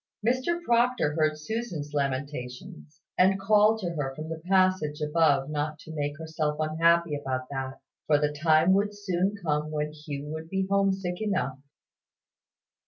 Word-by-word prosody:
Mr 260 +8 +1
Proctor 240 - +2
heard 155 -1 +1
Susan's 160 -4 -4
lamentations, 140 +3 -4 0.2
and 190 +1 +4
called 210 +2 +4
to 175 -3 -2
her 140 -5 -3
from 155 +2 -6
the 165 -1 -5
passage 185 -6 +2
above 150 -3 +2
not 150 0 -2
to 160 +1 -11
make 145 -1 -3
herself 155 -2 -2
unhappy 165 +1 +3
about 130 -3 -3
that; 135 -1 -4 0.3
for 150 - +5
the 150 0 0
time 160 +3 +4
would 205 +1 +1
soon 195 0 0
come 150 -3 -1
when 150 0 -2
Hugh 150 -2 -6
would 160 +1 -6
be 190 +1 0
homesick 195 -2 0
enough. 140 -11 -1
155 Hz, 150 wpm, -27 LUFS, 150-190 Hz, 0.3 s, for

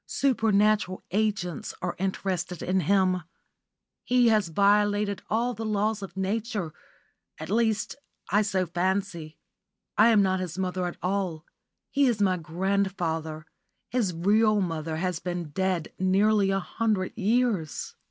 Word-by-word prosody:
Supernatural 215 -6 +2
agents 200 -6 -1
are - - -3
interested 185 -2 -2
in 185 +1 +1
him. 185 +1 +2 0.8
He 245 -1 +4
has 215 -4 +3
violated 205 +2 +2
all 235 +3 +1
the 225 - -6
laws 215 0 0
of 190 -1 -8
Nature 200 -3 -2 0.6
at - - -7
least, 220 -1 +1 0.4
I 205 +2 +4
fancy 185 -2 -1
so. - - -4
I - - +7
am 220 -3 +5
not 190 -1 +1
his 180 -2 -5
mother 185 -1 -1
at 175 - -6
all. 180 -4 -2 0.5
He 280 -1 +3
is 235 -4 +1
my 190 -3 +2
grandfather. 165 -2 -2 0.5
His 235 -7 +1
real 210 +5 +3
mother 165 -4 -2
has 180 -1 -1
been 175 -3 -4
dead 185 0 -1
nearly 195 +2 +3
a 195 0 +1
hundred 205 0 -1
years." 220 - 0
195 Hz, 135 wpm, -27 LUFS, 180-215 Hz, 0.8 s, I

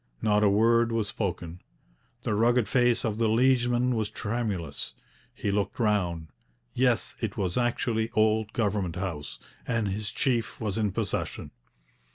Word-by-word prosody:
Not 105 - +2
a 105 - +5
word 115 +3 +4
was 110 -3 0
spoken. 90 -5 -4 0.6
The 115 - 0
rugged 115 +1 +3
face 120 -2 +2
of 110 -1 -2
the 115 -2 +3
liegeman 120 +1 +3
was 110 -3 -1
tremulous. 105 -9 -3 0.4
He 100 - -2
looked 100 -1 -1
round; 90 -8 0 0.4
yes, 125 -2 +1
it 110 -4 -3
was 95 -4 -1
actually 120 -2 0
old 110 0 +2
Government 100 -7 -1
House, 90 -6 -4 0.3
and 115 -3 0
his 100 +1 -3
chief 120 -1 -1
was 110 -1 -2
in 105 -2 +1
possession. - - -3
110 Hz, 145 wpm, -28 LUFS, 100-115 Hz, 0.6 s, a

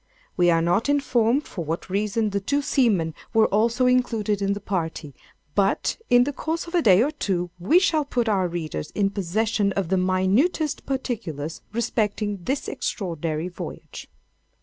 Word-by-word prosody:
We 175 -1 +4
are 165 -1 +3
not 175 +10 +1
informed 270 -2 +2
for 175 - -6
what 165 +2 -4
reason 210 +3 0
the 200 - 0
two 285 +9 -1
seamen 210 - +2 0.2
were 220 -1 +6
also 230 +4 +2
included 225 -5 +1
in 200 0 +1
the 200 - -5
party—but, 165 0 -2
in 245 0 +6
the 285 +3 -2
course 320 +4 -3
of 340 - -11
a 350 - +3
day 200 - +6
or 290 - 0
two, 180 - -2
we 195 - +4
shall 325 -5 +3
put 245 -4 -1
our 195 -4 +2
readers 160 - -4
in 200 -1 +1
possession 200 +2 0
of 190 -4 -2
the 190 - +2
minutest 190 - +1
particulars 170 - -4
respecting 210 -2 -1
this 275 +2 -2
extraordinary 165 -4 -3
voyage. 180 - -8
205 Hz, 160 wpm, -24 LUFS, 180-245 Hz, 0.2 s, were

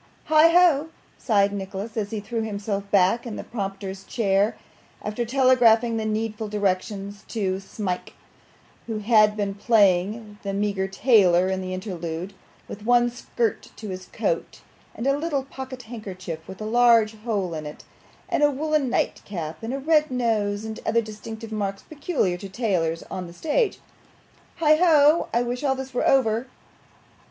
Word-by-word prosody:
'Heigho!' 320 -1 +5 0.3
sighed 200 -3 +2
Nicholas, 200 +2 -5
as 210 -3 -2
he 220 - -3
threw 225 +3 -3
himself 200 -2 -3
back 200 +5 +3
in 220 - -5
the - - -6
prompter's 195 -3 -5
chair, 200 -1 +1 0.5
after 215 +3 -2
telegraphing 240 -2 +4
the 220 - -2
needful 220 0 -2
directions 200 0 -2
to 190 -4 -2
Smike, 195 -2 -5 0.7
who 225 -2 -3
had 215 0 +4
been 200 -1 -1
playing 205 0 +2
a 200 -1 -3
meagre 200 -1 -1
tailor 190 -4 +4
in 190 0 -1
the 185 0 -5
interlude, 180 -1 -5 0.3
with 205 - -9
one 240 +1 +3
skirt 235 -2 -2
to 215 - -8
his 185 -1 -6
coat, - - -3 0.3
and 235 - -5
a 275 0 +3
little 290 -2 -1
pocket 260 -1 -8
handkerchief 185 -8 -7
with 190 - -9
a 215 - -5
large 230 -1 +4
hole 210 -6 -2
in 155 -1 -5
it, 150 - -10 0.4
and - - 0
a 295 - +6
woollen 295 -1 0
nightcap, 165 -9 -3
and 225 - -4
a 270 - -2
red 305 +2 +2
nose, 220 -4 0
and 220 0 -6
other 230 +1 +2
distinctive 220 +1 -8
marks 200 -2 -3
peculiar 290 - -1
to 195 +2 -8
tailors 185 -7 -1
on 185 -2 -4
the 170 - -11
stage. 320 - 0 0.8
'Heigho! 310 -1 +5
I 235 +1 +2
wish 245 +2 -4
all 270 -2 +2
this 265 0 -7
were 245 - +1
over. 240 -2 +2
215 Hz, 155 wpm, -24 LUFS, 195-245 Hz, 0.8 s, a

